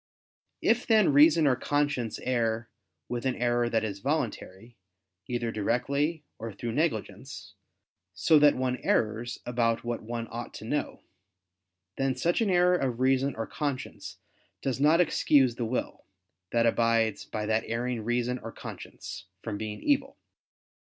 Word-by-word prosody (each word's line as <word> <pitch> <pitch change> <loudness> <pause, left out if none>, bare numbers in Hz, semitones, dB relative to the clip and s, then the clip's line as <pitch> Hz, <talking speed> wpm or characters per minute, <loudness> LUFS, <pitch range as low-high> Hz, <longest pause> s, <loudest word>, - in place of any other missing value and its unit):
If 235 +2 +2
then 215 -9 +4
reason 155 +2 +6
or 135 -3 +4
conscience 145 -4 -1
err 115 -3 -1 0.4
with 120 -1 -3
an 130 - 0
error 120 0 +1
that 115 -1 +1
is 100 -3 -4
voluntary, 120 -5 -3 0.5
either 120 -2 -2
directly, 140 +9 0 0.2
or 115 0 -5
through 115 +4 -5
negligence, 110 - -3 0.6
so 160 -2 +5
that 145 -1 +6
one 125 0 -1
errs 115 +2 0
about 115 -2 0
what 120 0 -3
one 115 +1 -5
ought 120 +1 -6
to - - -8
know; 145 +6 -3 0.9
then 135 -1 0
such 175 +6 +1
an 220 - +2
error 180 0 +4
of 125 -6 -2
reason 135 +1 +2
or 115 - -3
conscience 140 -1 -5 0.5
does 135 -1 -1
not 155 +4 +5
excuse 145 -6 +4
the 115 0 -3
will, 120 +3 -3 0.5
that 115 0 +3
abides 115 -2 +2
by 105 -1 -4
that 110 +1 +1
erring 120 +1 -2
reason 120 +2 -1
or - - -8
conscience, - - -9 0.2
from 110 - -3
being 105 -1 -5
evil. 275 -1 +1
120 Hz, 145 wpm, -28 LUFS, 115-145 Hz, 0.9 s, reason